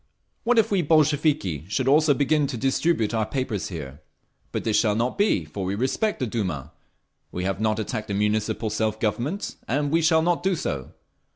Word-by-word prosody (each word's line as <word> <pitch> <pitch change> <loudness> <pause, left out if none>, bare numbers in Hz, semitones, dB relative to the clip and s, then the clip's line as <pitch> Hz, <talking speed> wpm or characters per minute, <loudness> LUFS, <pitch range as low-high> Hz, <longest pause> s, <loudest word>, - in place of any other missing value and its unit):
What 245 0 +3
if 225 - +3
we 195 -3 +3
Bolsheviki 150 - +2
should 130 +6 -1
also 150 +1 +5
begin 145 +1 +2
to 130 -3 -4
distribute 135 -2 +1
our 110 -1 +1
papers 130 -7 -2
here? 75 -5 -7 0.5
But - - -3
this 110 -2 0
shall 105 -3 +3
not 120 +3 0
be, 200 - +2
for 95 +6 -6
we 95 +2 -1
respect 135 - 0
the 130 - 0
Duma. 95 - -3 0.6
We 90 - -4
have 95 +1 -2
not 110 -1 +1
attacked 110 0 -3
the 100 - -2
Municipal 105 +1 0
Self 110 0 -1
Government, 120 - -2
and 145 +3 0
we 165 +1 +3
shall 160 0 +4
not 175 0 +1
do 190 +1 +1
so. 70 - -4
120 Hz, 190 wpm, -24 LUFS, 105-155 Hz, 0.6 s, also